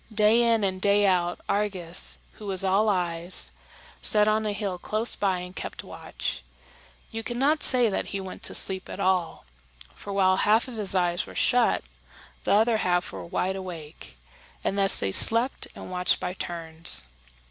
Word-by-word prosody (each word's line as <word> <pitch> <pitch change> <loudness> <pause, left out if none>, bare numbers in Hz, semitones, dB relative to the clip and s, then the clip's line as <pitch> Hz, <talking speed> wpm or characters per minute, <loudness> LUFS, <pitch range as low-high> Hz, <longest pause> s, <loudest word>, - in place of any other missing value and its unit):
Day 215 +2 +4
in 230 -2 +3
and 185 -1 -1
day 205 +1 +4
out, 175 -2 +1
Argus, 190 -4 0 0.2
who 210 - -8
was 190 -1 +3
all 195 +3 +3
eyes, 175 -2 -1 0.5
sat 210 0 +5
on 215 0 +1
a - - 0
hill 200 -3 -3
close 215 +5 0
by 190 -3 0
and 180 +1 -9
kept - - -6
watch; - - -5 0.7
and - - -28
you - - -2
could 240 +1 -5
not 290 +4 +2
say 250 -2 +3
that 205 - -2
he 200 - -4
went 190 -1 -8
to - - -1
sleep 190 -1 -2
at - - -7
all, 185 - 0 0.5
for 200 - -9
while 190 -1 +3
half 220 +5 +3
of 250 - -8
his 205 -3 -3
eyes 175 -1 +1
were - - -11
shut, 245 -2 +2 0.6
the - - +1
other 220 +2 +4
half 180 -3 0
were - - -7
wide 185 +2 -2
awake, 165 - -9 0.5
and - - -1
thus 195 -1 +4
they 95 - -1
slept 230 - +2
and - - -9
watched 180 0 +1
by 180 - -3
turns. 165 - -3
195 Hz, 180 wpm, -26 LUFS, 180-215 Hz, 0.7 s, sat